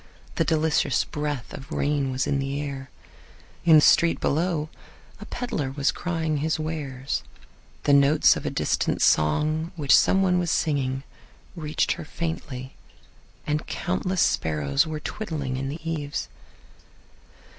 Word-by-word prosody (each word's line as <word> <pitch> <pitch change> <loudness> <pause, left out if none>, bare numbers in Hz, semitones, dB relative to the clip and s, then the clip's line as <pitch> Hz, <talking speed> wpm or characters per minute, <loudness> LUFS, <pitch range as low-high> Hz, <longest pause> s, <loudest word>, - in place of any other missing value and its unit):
The - - +1
delicious 160 0 +2
breath 150 -4 -4
of 140 +3 -9
rain 145 -3 0
was 130 0 -1
in 140 - 0
the 135 +1 -2
air. 135 -2 -5 0.8
In 165 -2 +7
the 155 - +8
street 165 +2 +4
below 155 0 0 0.5
a - - -9
peddler 155 - -3
was 140 +1 +1
crying 160 -3 -2
his 155 +2 -1
wares. 145 -4 -3 0.6
The 145 - +3
notes 140 +2 +5
of - - -5
a - - -1
distant - - 0
song 155 - +2
which 145 -5 +4
some 195 0 +4
one 180 -1 +3
was 175 -1 -1
singing 135 -4 0 0.5
reached 155 -2 -1
her - - -3
faintly, 150 -5 -5 0.7
and 150 0 -1
countless 185 0 -1
sparrows 75 - +1
were 155 -1 -4
twittering 150 -9 -4
in 135 +1 -3
the 155 +3 -7
eaves. 150 -3 -3
150 Hz, 140 wpm, -25 LUFS, 135-160 Hz, 0.8 s, the